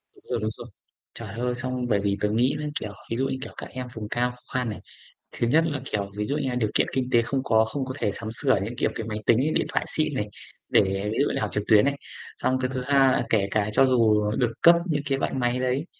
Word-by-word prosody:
Đúng -, -, -21 dB
rồi, -, -, 0 dB
đúng 110 Hz, -, 0 dB
rồi. -, -, -9 dB, 0.5 s
Trời -, -, -8 dB
ơi, 125 Hz, 0 st, 0 dB
xong 125 Hz, 0 st, -3 dB
bởi 105 Hz, -4 st, +2 dB
vì 100 Hz, 0 st, 0 dB
tớ 105 Hz, -, +2 dB
nghĩ 120 Hz, +6 st, +2 dB
nó, 150 Hz, -, -3 dB
kiểu, 105 Hz, -, -5 dB, 0.2 s
ví 115 Hz, -, 0 dB
dụ 135 Hz, +1 st, +1 dB
như, 130 Hz, -, -2 dB
kiểu, -, -, -7 dB
các -, -, -7 dB
em 125 Hz, 0 st, -6 dB
vùng 105 Hz, -2 st, -6 dB
cao 125 Hz, +2 st, 0 dB
khó 125 Hz, -, -15 dB, 0.2 s
khăn 125 Hz, -2 st, 0 dB
này. 105 Hz, -, -5 dB, 0.5 s
Thứ 120 Hz, -, -1 dB
nhất 155 Hz, +7 st, +4 dB
là, 145 Hz, -3 st, -2 dB
kiểu, 100 Hz, -5 st, -3 dB
ví 105 Hz, -, -1 dB
dụ 140 Hz, +6 st, -1 dB
như 140 Hz, -3 st, -1 dB
là 125 Hz, -, -2 dB
điều 110 Hz, -4 st, +1 dB
kiện -, -, +2 dB
kinh 130 Hz, -1 st, -1 dB
tế 120 Hz, -, +5 dB
không 130 Hz, +3 st, -2 dB
có, 110 Hz, -3 st, +3 dB
không 135 Hz, +4 st, -3 dB
có 130 Hz, -, -5 dB
thể 105 Hz, -, 0 dB
sắm 110 Hz, +2 st, -6 dB
sửa 130 Hz, +3 st, +1 dB
những, 115 Hz, +4 st, -5 dB
kiểu, -, -, +1 dB
cái 110 Hz, -, -4 dB
máy 105 Hz, -1 st, -3 dB
tính 115 Hz, -, +5 dB
ấy, 150 Hz, +4 st, +1 dB
điện -, -, +2 dB
thoại -, -, 0 dB
xịn 155 Hz, -1 st, -1 dB
này 105 Hz, -5 st, -2 dB, 0.4 s
để -, -, +6 dB, 0.3 s
ví -, -, -3 dB
dụ 145 Hz, -, +2 dB
như -, -, -1 dB
học 110 Hz, -, -1 dB
trực 105 Hz, -, -1 dB
tuyến 105 Hz, 0 st, +6 dB
này. 140 Hz, 0 st, +1 dB, 0.4 s
Xong 130 Hz, 0 st, 0 dB
cái 130 Hz, 0 st, -1 dB
thứ 130 Hz, -, -2 dB
hai 135 Hz, -2 st, +4 dB
kể 100 Hz, -3 st, +2 dB
cả 105 Hz, -1 st, +1 dB
cho 135 Hz, -, +5 dB
dù 110 Hz, -5 st, +3 dB
được 125 Hz, -3 st, +1 dB
cấp 170 Hz, 0 st, +8 dB
những 150 Hz, -5 st, -1 dB
cái 135 Hz, -, +2 dB
loại -, -, -2 dB
máy 125 Hz, -1 st, 0 dB
đấy, 130 Hz, +4 st, 0 dB
125 Hz, 285 wpm, -25 LUFS, 110-135 Hz, 0.5 s, cấp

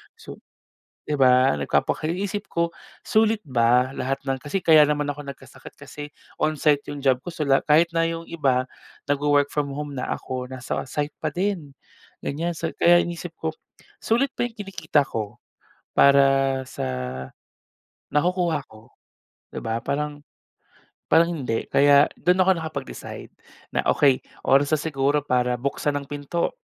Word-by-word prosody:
So, -, -, -11 dB, 0.7 s
di 150 Hz, -, -4 dB
ba? 130 Hz, 0 st, +5 dB
Nagpapaka 155 Hz, -, 0 dB
iniisip 200 Hz, +4 st, -3 dB
ko, 170 Hz, 0 st, -1 dB, 0.3 s
sulit 220 Hz, -2 st, +2 dB
ba 125 Hz, 0 st, +2 dB
lahat 135 Hz, +1 st, -3 dB
ng 135 Hz, -1 st, -2 dB
kasi 180 Hz, +6 st, -3 dB
kaya 155 Hz, -2 st, +7 dB
naman 150 Hz, 0 st, 0 dB
ako 145 Hz, -, -10 dB
nagkasakit 140 Hz, -, -11 dB
kasi 145 Hz, 0 st, -9 dB, 0.3 s
on-site 150 Hz, -1 st, +1 dB
yung 145 Hz, -1 st, -6 dB
job 130 Hz, -1 st, +3 dB
ko. 175 Hz, -, -10 dB
So, 165 Hz, -3 st, -3 dB
lahat 135 Hz, +2 st, +2 dB
kahit 160 Hz, +3 st, +5 dB
na 165 Hz, 0 st, +1 dB
yung 165 Hz, 0 st, -4 dB
iba 135 Hz, -7 st, 0 dB, 0.4 s
nagwo-work 145 Hz, 0 st, +1 dB
from 145 Hz, -1 st, -1 dB
home 145 Hz, -1 st, -5 dB
na, 125 Hz, -2 st, -4 dB
ako 125 Hz, -1 st, -4 dB
nasa 130 Hz, -1 st, -4 dB
site 145 Hz, +1 st, -2 dB
pa 155 Hz, -, -1 dB
din, 175 Hz, -4 st, -3 dB, 0.5 s
ganyan. 165 Hz, +3 st, -2 dB
So, 165 Hz, -1 st, -3 dB
kaya 175 Hz, 0 st, +5 dB
iniisip 170 Hz, -1 st, -7 dB
ko, 160 Hz, -1 st, -3 dB, 0.5 s
sulit 255 Hz, +5 st, +1 dB
ba 240 Hz, -, -1 dB
yung 225 Hz, -, -21 dB
kinikita 195 Hz, -8 st, 0 dB
ko 105 Hz, -2 st, -5 dB, 0.6 s
para 135 Hz, -1 st, +5 dB
sa -, -, -5 dB, 1.3 s
nakukuha 175 Hz, -1 st, +1 dB
ko, 110 Hz, +1 st, -17 dB, 0.6 s
di -, -, -7 dB
ba? 115 Hz, +1 st, -2 dB
Parang 145 Hz, 0 st, -3 dB, 0.9 s
parang 170 Hz, +2 st, +4 dB
hindi. 125 Hz, -7 st, -2 dB
Kaya 140 Hz, +1 st, +6 dB
dun 180 Hz, +3 st, +2 dB
ako 190 Hz, +1 st, +5 dB
nakapag-decide 155 Hz, -, -7 dB, 0.4 s
na -, -, +1 dB
okey, 135 Hz, -3 st, +4 dB, 0.2 s
oras 140 Hz, +3 st, +4 dB
na 155 Hz, -, +3 dB
siguro 145 Hz, -1 st, 0 dB
para 125 Hz, -2 st, +1 dB
buksan 140 Hz, +3 st, -1 dB
ang 140 Hz, -, -5 dB
pinto 145 Hz, +4 st, -3 dB
145 Hz, 150 wpm, -24 LUFS, 135-165 Hz, 1.3 s, kaya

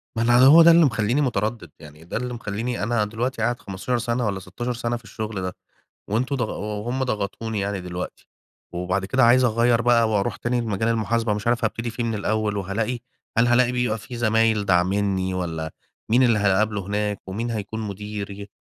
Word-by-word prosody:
ما 115 Hz, -, -1 dB
أنا 120 Hz, +2 st, +6 dB
هو 160 Hz, +5 st, +9 dB
ده 170 Hz, +1 st, +8 dB
اللي 165 Hz, -1 st, +6 dB
مخليني 120 Hz, +3 st, +1 dB
متردد، 110 Hz, -, -2 dB
يعني 75 Hz, +1 st, -13 dB
ده 85 Hz, -, -4 dB
اللي 125 Hz, +1 st, -4 dB
مخليني 115 Hz, +1 st, -3 dB
أنا 110 Hz, -1 st, +1 dB
دلوقتي 115 Hz, +3 st, -3 dB
قاعد 120 Hz, +2 st, 0 dB
15 100 Hz, +6 st, -3 dB
سَنة 120 Hz, 0 st, -1 dB
والّا 100 Hz, -2 st, -1 dB
16 120 Hz, +7 st, -5 dB
سَنة 120 Hz, 0 st, -2 dB
في 115 Hz, -, -17 dB
الشغل 105 Hz, -1 st, -5 dB
ده، 90 Hz, -1 st, -3 dB, 0.6 s
وأنتم 125 Hz, +6 st, 0 dB
ضاغ 125 Hz, -4 st, -3 dB
وهُم 105 Hz, +5 st, -2 dB
ضغطوني 110 Hz, -1 st, -3 dB
يعني 100 Hz, -1 st, -2 dB
دلوقتي. 90 Hz, 0 st, -7 dB, 0.5 s
وبعد 90 Hz, +2 st, -1 dB
كده 130 Hz, +5 st, +3 dB
عايز 125 Hz, +2 st, +5 dB
أغيّر 115 Hz, 0 st, +3 dB
بقى 115 Hz, -1 st, +4 dB
وأرُوح 100 Hz, -2 st, 0 dB
تاني 120 Hz, 0 st, -1 dB
لمجال 110 Hz, 0 st, -1 dB
المحاسبة، 115 Hz, -1 st, 0 dB
مش 105 Hz, +2 st, -5 dB
عارف 120 Hz, -1 st, +1 dB
هابتدي 115 Hz, +1 st, -2 dB
فيه 115 Hz, +1 st, -3 dB
من 115 Hz, -1 st, -1 dB
الأول 105 Hz, 0 st, -1 dB
وهالاقي 105 Hz, +6 st, -2 dB, 0.4 s
هل 120 Hz, -, +5 dB
هالاقي 120 Hz, +1 st, +3 dB
بيبقى 120 Hz, -3 st, 0 dB
في 120 Hz, +3 st, -9 dB
زمايل 110 Hz, -2 st, +2 dB
داعمني، 95 Hz, 0 st, +1 dB
والّا 80 Hz, -3 st, -3 dB, 0.4 s
مين 125 Hz, +3 st, +5 dB
اللي 115 Hz, -3 st, +4 dB
هاقابله 100 Hz, 0 st, +1 dB
هناك، 105 Hz, 0 st, -1 dB
ومين 115 Hz, +5 st, -3 dB
هيكُون 110 Hz, 0 st, -4 dB
مديري؟ 100 Hz, -1 st, -6 dB
110 Hz, 185 wpm, -23 LUFS, 100-120 Hz, 0.6 s, هو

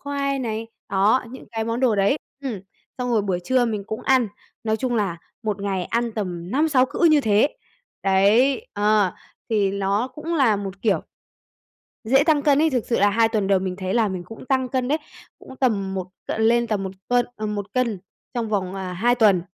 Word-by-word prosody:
khoai 280 Hz, -1 st, -2 dB
này, 225 Hz, -3 st, -3 dB, 0.2 s
đó, 200 Hz, +7 st, +3 dB
những 260 Hz, -, -10 dB
cái 225 Hz, -1 st, -2 dB
món 230 Hz, +2 st, -2 dB
đồ 250 Hz, -4 st, +3 dB
đấy 200 Hz, +7 st, +3 dB, 0.3 s
ừm, 235 Hz, -8 st, -4 dB, 0.4 s
xong 250 Hz, -1 st, -2 dB
rồi 225 Hz, -3 st, +2 dB
buổi 185 Hz, -3 st, -1 dB
trưa 255 Hz, +3 st, +3 dB
mình 215 Hz, -4 st, -2 dB
cũng 220 Hz, 0 st, -5 dB
ăn, 255 Hz, -5 st, +3 dB, 0.4 s
nói 220 Hz, 0 st, +1 dB
chung 250 Hz, +1 st, -1 dB
là 200 Hz, -6 st, 0 dB, 0.3 s
một 210 Hz, -2 st, -2 dB
ngày 190 Hz, -3 st, -1 dB
ăn 235 Hz, +2 st, -1 dB
tầm 180 Hz, -5 st, -4 dB
5-6 275 Hz, -1 st, +3 dB
cữ 340 Hz, -, +1 dB
như 300 Hz, -2 st, +5 dB
thế, 215 Hz, +3 st, +2 dB, 0.5 s
đấy 215 Hz, -, +3 dB
ờ, 205 Hz, -2 st, +2 dB, 0.4 s
thì 205 Hz, -3 st, +2 dB
nó 200 Hz, +4 st, 0 dB
cũng 305 Hz, +6 st, -5 dB
là 255 Hz, -9 st, +4 dB
một 195 Hz, -1 st, -6 dB
kiểu 210 Hz, -4 st, +2 dB, 1.0 s
dễ 265 Hz, +5 st, +4 dB
tăng 305 Hz, -2 st, +3 dB
cân 285 Hz, -1 st, +4 dB
ấy. 320 Hz, -, +4 dB
Thực 250 Hz, -6 st, -1 dB
sự 235 Hz, -, +1 dB
là 205 Hz, -, +5 dB
2 225 Hz, +2 st, +3 dB
tuần 215 Hz, -4 st, 0 dB
đầu 195 Hz, -1 st, +3 dB
mình 185 Hz, -1 st, -3 dB
thấy 185 Hz, 0 st, -3 dB
là 230 Hz, -2 st, +3 dB
mình 185 Hz, -3 st, -4 dB
cũng 225 Hz, +7 st, -11 dB
tăng 260 Hz, -1 st, +1 dB
cân 255 Hz, 0 st, -1 dB
đấy, 295 Hz, +4 st, +2 dB, 0.4 s
cũng 265 Hz, -, -12 dB
tầm 205 Hz, -8 st, 0 dB
một 190 Hz, -2 st, -3 dB, 0.2 s
c -, -, -2 dB
lên 235 Hz, +2 st, +3 dB
tầm 210 Hz, -3 st, -1 dB
1 190 Hz, -, -4 dB, 0.2 s
cân, 245 Hz, 0 st, +3 dB
à, 215 Hz, -, -3 dB
1 205 Hz, -1 st, -4 dB
cân 235 Hz, -6 st, 0 dB, 0.3 s
trong 235 Hz, -3 st, -2 dB
vòng, 195 Hz, -3 st, -1 dB
à, 185 Hz, -2 st, -4 dB
2 235 Hz, +7 st, +2 dB
tuần, 210 Hz, -7 st, +4 dB
220 Hz, 210 wpm, -23 LUFS, 200-255 Hz, 1.0 s, như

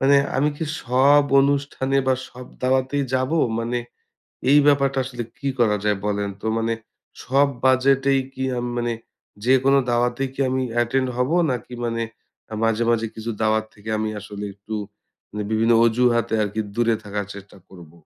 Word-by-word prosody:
মানে 140 Hz, +1 st, +5 dB, 0.2 s
আমি 145 Hz, +3 st, +3 dB
কি 160 Hz, -, -3 dB, 0.2 s
সব 135 Hz, +4 st, +5 dB, 0.2 s
অনুষ্ঠানে 140 Hz, -1 st, 0 dB
বা 130 Hz, -, +4 dB
সব 125 Hz, 0 st, -11 dB, 0.2 s
দাওয়াতেই 130 Hz, +2 st, +1 dB
যাব? 130 Hz, +1 st, 0 dB, 0.3 s
মানে 120 Hz, +1 st, -1 dB, 0.7 s
এই 145 Hz, -, +7 dB
ব্যাপারটা 140 Hz, -2 st, +3 dB
আসলে 125 Hz, -2 st, -5 dB, 0.2 s
কি 140 Hz, -, -2 dB
করা 105 Hz, -3 st, +3 dB
যায় 105 Hz, -2 st, +1 dB
বলেন 100 Hz, -1 st, -1 dB
তো? -, -, -6 dB
মানে 115 Hz, 0 st, 0 dB, 0.5 s
সব 140 Hz, +3 st, +3 dB, 0.2 s
বাজেটেই 135 Hz, +1 st, +3 dB
কি, 130 Hz, 0 st, -4 dB
আম 120 Hz, -, -2 dB
মানে 120 Hz, 0 st, -1 dB, 0.5 s
যেকোন 130 Hz, +2 st, +4 dB, 0.2 s
দাওয়াতেই 120 Hz, +2 st, 0 dB
কি 140 Hz, -, -6 dB
আমি 130 Hz, 0 st, 0 dB
অ্যাটেন্ড 125 Hz, +2 st, +1 dB
হব? 125 Hz, +3 st, 0 dB, 0.2 s
নাকি 125 Hz, 0 st, -4 dB
মানে 115 Hz, 0 st, -1 dB, 0.5 s
আ -, -, -3 dB
মাঝে, 115 Hz, +1 st, +1 dB
মাঝে 115 Hz, -1 st, +1 dB
কিছু 115 Hz, +1 st, -5 dB
দাওয়াত 110 Hz, 0 st, +2 dB
থেকে 105 Hz, +1 st, -12 dB
আমি 110 Hz, 0 st, -1 dB
আসলে 105 Hz, 0 st, -7 dB
একটু 100 Hz, +2 st, -8 dB, 0.6 s
মানে 105 Hz, 0 st, -4 dB
বিভিন্ন 115 Hz, +2 st, +3 dB
অজুহাতে 120 Hz, -1 st, +2 dB
আরকি 105 Hz, +1 st, -2 dB, 0.2 s
দূরে 115 Hz, -1 st, +3 dB
থাকার 105 Hz, -1 st, -4 dB
চেষ্টা 100 Hz, 0 st, -12 dB
করব? 85 Hz, -4 st, -13 dB
120 Hz, 165 wpm, -22 LUFS, 110-135 Hz, 0.7 s, এই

